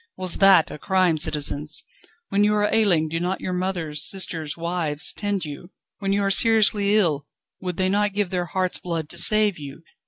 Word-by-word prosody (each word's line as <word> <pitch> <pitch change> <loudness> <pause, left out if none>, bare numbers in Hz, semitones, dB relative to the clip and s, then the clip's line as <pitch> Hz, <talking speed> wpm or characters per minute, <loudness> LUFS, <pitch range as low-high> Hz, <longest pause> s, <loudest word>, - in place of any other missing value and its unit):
Was 185 -2 -2
that 195 -4 +5
a - - -9
crime, 185 -3 +1
citizens? 150 -1 0 0.5
When 200 +1 +1
you 210 0 +2
are 210 0 0
ailing, 185 -8 +3
do 165 +1 -3
not 180 +2 -2
your 185 - -4
mothers, 175 -5 -3
sisters, 165 -6 -2
wives 170 -2 -1
tend 205 -4 -3
you? 150 +4 -9 0.3
when 195 -2 -2
you 200 0 0
are 195 - 0
seriously 210 -1 +4
ill, 150 -8 0 0.3
would 180 -2 -5
they 185 - 0
not 205 +1 0
give 205 -2 -2
their 180 -1 -2
heart's 185 0 -1
blood 165 -3 -4
to 175 - -3
save 210 -1 +3
you? 145 +2 -10
180 Hz, 190 wpm, -22 LUFS, 160-200 Hz, 0.5 s, that